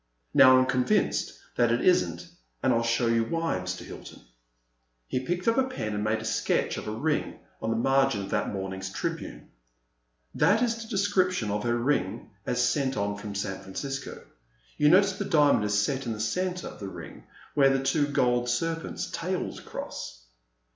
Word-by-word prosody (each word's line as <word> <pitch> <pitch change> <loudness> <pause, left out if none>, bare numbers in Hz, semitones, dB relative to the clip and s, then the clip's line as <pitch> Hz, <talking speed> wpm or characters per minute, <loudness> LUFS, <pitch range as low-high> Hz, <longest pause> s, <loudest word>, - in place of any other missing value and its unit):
Now 130 0 +8
I - - +6
am - - +2
convinced 125 -1 +1 0.2
that 120 -1 +3
it 120 - +2
is 180 - +5
n't, 85 0 -8 0.4
and - - +4
I - - +3
'11 115 0 0
show 115 +1 +2
you 115 0 +3
why, 165 - -1
Mr. 90 0 -5
Hilton." - - -11 0.8
He 125 - -2
picked 175 - -3
up 230 +3 +4
a 265 - +3
pen 110 - -4
and 105 0 -2
made 110 +1 +1
a - - -7
sketch - - 0
of - - -6
a - - -2
ring 150 +8 -1 0.2
on 110 - -1
a - - +1
margin 135 -3 +2
of - - -8
that - - 0
morning's 95 -1 -4
Tribune, 95 - -5 0.8
That 205 +10 +3
is 230 -1 0
the 225 - -8
description 185 - +1
of 105 0 -1
her 120 0 +1
ring 120 -7 -1 0.2
as 125 0 +2
sent 135 0 0
on 100 0 -1
from 100 0 -7
San 95 -1 -3
Francisco. 135 +9 -6 0.5
You 150 - +4
notice 195 +3 +5
the 200 - -1
diamond 145 - +4
is 105 0 +2
set 130 +4 -1
in 115 - -1
the 105 - -7
centre 180 +11 -2
of - - -13
the 100 -2 -5
ring - - -10 0.3
where 140 -2 +5
the 135 0 +1
two 145 +2 +2
gold 125 -3 +1
serpents' 165 +7 -2
tails 180 +2 -3
cross - - -7
125 Hz, 195 wpm, -27 LUFS, 105-160 Hz, 0.8 s, Now